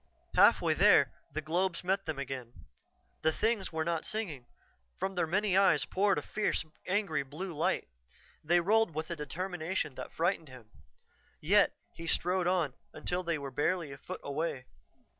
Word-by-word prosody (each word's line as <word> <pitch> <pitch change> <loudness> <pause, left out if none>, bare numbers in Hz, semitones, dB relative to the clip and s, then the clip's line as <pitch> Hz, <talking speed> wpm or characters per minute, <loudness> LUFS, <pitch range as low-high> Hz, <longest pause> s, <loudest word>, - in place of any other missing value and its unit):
Halfway - - +5
there, - - +5 0.2
the 155 - -4
globes 175 +4 0
met 190 +1 0
them 160 -3 -2
again. 130 -9 -6 0.6
The 160 - +3
things 215 +2 0
were 160 -1 -1
not 170 -1 -1
singing; 165 - -4 0.5
from 195 - -2
their 175 -3 0
many 195 +2 +1
eyes 195 0 +4
poured 200 +1 +2
a - - -2
fierce, 215 -6 -1 0.2
angry 185 -6 +1
blue 155 +7 -6
light. 155 - 0 0.6
They 175 +3 +4
rolled 210 -2 +3
with 160 +2 -3
a - - -1
determination 165 0 -3
that - - -7
frightened 165 -2 0
him. 120 -4 -13 0.7
Yet - - +4 0.2
he 165 - -8
strode 180 +2 +1
on, 175 -7 +1 0.2
until 180 +1 -2
they 170 -2 -1
were 140 -2 -6
barely 155 +3 0
a 135 - -8
foot - - -7
away. 140 -2 -3
170 Hz, 160 wpm, -31 LUFS, 150-190 Hz, 0.7 s, Halfway